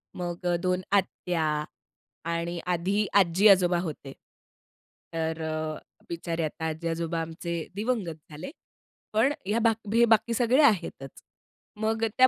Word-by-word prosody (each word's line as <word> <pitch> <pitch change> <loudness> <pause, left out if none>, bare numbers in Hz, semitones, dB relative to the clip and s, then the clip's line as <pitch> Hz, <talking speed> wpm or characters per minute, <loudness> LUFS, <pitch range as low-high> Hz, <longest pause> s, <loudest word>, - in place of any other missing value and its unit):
मग 175 0 -5
अ, 175 - +3
2 180 0 +1
आत्या 180 -4 +1 0.9
आणि 170 +1 -2
आधी 185 +4 +1
आजी-आजोबा 185 -1 +5
होते. 145 -5 -6 1.0
तर 160 0 -2
अ, 155 -1 -2 0.3
बिचारे 170 0 -3
आता 160 +1 -5
आजी-आजोबा 165 +1 -2
आमचे 165 +1 -4 0.2
दिवंगत 210 -6 -1
झाले. 155 - -7 0.6
पण 240 +7 +3
ह्या 210 +4 +1
बाक 225 -1 +3
बी 230 +3 +4
बाकी 225 +2 +2
सगळे 245 +4 +4
आहेतच. 170 - +1 0.6
मग 220 +1 0
अ, - - +4
त्या 255 - +8
175 Hz, 125 wpm, -27 LUFS, 165-215 Hz, 1.0 s, त्या